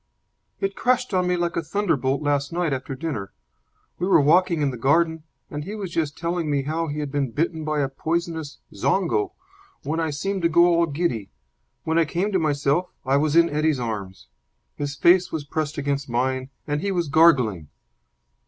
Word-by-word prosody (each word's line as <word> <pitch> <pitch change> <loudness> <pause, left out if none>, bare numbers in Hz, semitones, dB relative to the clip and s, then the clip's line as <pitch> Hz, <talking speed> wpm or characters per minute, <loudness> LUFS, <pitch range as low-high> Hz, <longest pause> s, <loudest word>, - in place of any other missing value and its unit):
"It 195 0 -2
crashed 250 -2 +1
on 180 -1 +2
me 180 0 +1
like 175 0 -1
a - - 0
thunderbolt 155 -6 0
last 145 0 0
night 170 -3 0
after 135 0 -4
dinner. 130 -10 -4 0.7
We 180 - 0
were 195 - +6
walking 165 +2 +3
in 140 - +1
the - - -6
garden, 160 +5 +2 0.3
and 150 0 -4
he 200 +7 -6
was 195 -5 -5
just 155 -4 -2
telling 170 -1 -2
me 140 -2 +1
how 160 +3 -2
he 150 0 -3
had 145 -2 -4
been 140 -2 0
bitten 160 +6 -2
by 155 -1 0
a 140 - +1
poisonous 160 +2 -3 0.2
zongo, 400 -3 0 0.5
when 160 +2 -2
I 160 -1 0
seemed 190 +7 -2
to 170 - +3
go 170 +1 +5
all 170 -1 +3
giddy. 140 - -2 0.5
When 160 +1 +1
I 165 - +4
came 180 +7 -1
to 190 - +2
myself 150 +2 +1 0.2
I 135 +1 +3
was 150 +1 +1
in 170 0 +6
Eddie's 150 -2 +1
arms. 100 - -5 0.5
His 145 0 -4
face 175 +5 +4
was 155 -3 -4
pressed 155 +1 -3
against 140 -1 -2
mine, 130 +2 -1 0.2
and 145 0 -2
he 200 - -1
was 175 -3 0
gargling." 130 - +4
155 Hz, 190 wpm, -24 LUFS, 140-170 Hz, 0.7 s, were